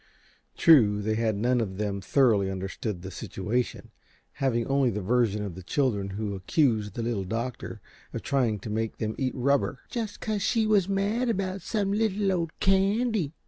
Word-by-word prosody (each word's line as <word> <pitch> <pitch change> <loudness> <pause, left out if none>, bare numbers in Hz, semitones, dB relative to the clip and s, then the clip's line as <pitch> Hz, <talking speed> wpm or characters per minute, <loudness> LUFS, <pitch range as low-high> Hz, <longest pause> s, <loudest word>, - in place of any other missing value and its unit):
True, 115 - +6
they 110 +1 -1
had 110 -1 0
none 120 +4 +1
of 95 -4 -4
them 100 -1 -2
thoroughly 105 -3 +3
understood 95 0 -4
the 95 - -6
situation, 105 +5 -3 0.5
having 120 -4 +1
only 135 -2 +2
the 105 - -2
version 110 -1 +1
of 100 -4 -5
the 95 - -9
children, 100 -1 0
who 105 +1 -3
accused 105 - +1
the 115 - -3
Little 115 -4 -1
Doctor 115 +6 -4 0.3
of - - -5
trying 125 -6 +1
to 105 - -6
make 110 +1 -2
them 110 0 -2
eat 130 -2 -1
rubber 140 +1 +1
"just 225 -4 -4
cause 215 -2 -2
she 225 +3 +2
was 205 -3 +3
mad 205 +5 0
about 195 -3 -2
some 200 +1 -1
little 205 -2 +1
old 170 -3 -2
candy." 195 - +2
125 Hz, 175 wpm, -27 LUFS, -, 0.5 s, True